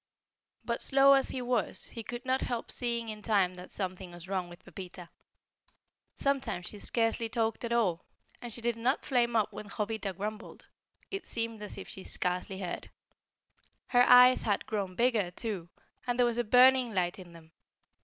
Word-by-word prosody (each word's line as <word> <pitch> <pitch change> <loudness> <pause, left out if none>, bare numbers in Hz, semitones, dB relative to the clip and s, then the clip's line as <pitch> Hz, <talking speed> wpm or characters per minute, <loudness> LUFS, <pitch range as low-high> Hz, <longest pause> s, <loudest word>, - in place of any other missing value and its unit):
But - - -2
slow 275 0 +6
as 270 -1 +3
he 255 - -2
was, 240 -6 -1
he 230 - -6
could 240 +3 -7
not 260 +1 +1
help 240 -2 -3
seeing 235 -2 -1
in 215 -1 -7
time 195 -4 +2
that 180 0 -11
something 185 -1 -4
was 175 +1 -10
wrong 185 -2 -2
with 175 - -14
Pepita. 180 -2 -10 1.1
Sometimes 275 -10 -1
she 210 - -8
scarcely 225 +1 0
talked 225 0 -1
at 235 - -3
all, 200 -8 +1 0.4
and 240 - -6
she 235 - -4
did 235 0 0
not 250 +5 0
flame 240 -3 +1
up 215 -1 +1
when 210 0 -8
Jovita 210 -1 -3
grumbled; 210 +4 -6 0.5
it 390 0 -5
seemed 230 -2 -3
as 210 - -6
if - - -8
she 190 - -8
scarcely 180 +1 -2
heard. 180 -2 -5 1.0
Her 245 -1 +5
eyes 250 +1 +8
had 205 -2 0
grown 195 -4 -3
bigger, 230 -5 +2
too, 180 -2 -4 0.4
and 245 0 0
there 245 - +4
was 240 0 0
a - - +2
burning 250 0 +5
light 180 0 0
in 175 -2 -12
them. 165 -1 -15
220 Hz, 180 wpm, -30 LUFS, 190-240 Hz, 1.1 s, eyes